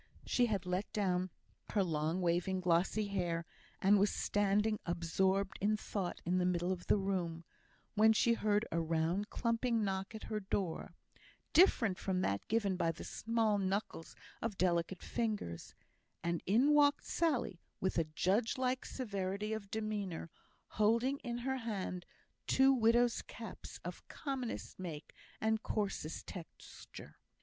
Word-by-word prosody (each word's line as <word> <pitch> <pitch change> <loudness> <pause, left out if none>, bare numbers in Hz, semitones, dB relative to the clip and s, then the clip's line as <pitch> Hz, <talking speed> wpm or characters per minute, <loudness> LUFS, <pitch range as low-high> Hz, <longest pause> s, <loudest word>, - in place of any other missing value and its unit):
She 245 -1 +3
had 200 -4 -1
let 180 +3 -2
down 185 -3 +1 0.4
her 205 - +3
long 160 +1 0
waving 175 +2 +1
glossy 180 +4 +2
hair, 175 -4 -1 0.4
and 200 +1 +6
was 200 +1 +4
standing 205 +1 +1
absorbed 190 +3 0
in 210 +2 +2
thought 195 -4 -3
in 180 +2 +2
the 180 - +2
middle 175 0 +1
of 180 -1 -4
the - - +5
room, 180 -4 -2 0.5
when 220 +1 +6
she 235 +2 +4
heard 210 -1 +1
a 170 - +1
round 165 +5 0
clumping 230 -1 +1
knock 195 +1 -2
at 215 - -7
her 215 - -2
door, 190 -3 -3 0.6
different 230 - +5
from 185 -2 0
that 100 - -1
given 205 -4 +1
by 165 -2 +2
the 165 - -9
small 225 -2 0
knuckles 195 -3 -2 0.3
of 220 -4 -3
delicate 175 0 +1
fingers, 210 - -3 0.5
and 170 0 0
in 250 +10 +5
walked 290 -1 +4
Sally, 265 - 0 0.2
with 190 -2 0
a 165 - +2
judge 195 - +1
like 255 0 0
severity 200 -3 -3
of 210 -2 -5
demeanour, 205 -7 -3 0.4
holding 235 +6 +2
in 240 -2 -4
her 265 +2 -1
hand 195 -6 -4 0.4
two 270 +1 +5
widow's 240 0 +3
caps - - -9
of - - -7
commonest 265 -9 -4
make 160 -5 -6 0.3
and 220 0 +1
coarsest 200 -9 -2
texture. 175 -4 -10
200 Hz, 145 wpm, -35 LUFS, 180-225 Hz, 0.6 s, and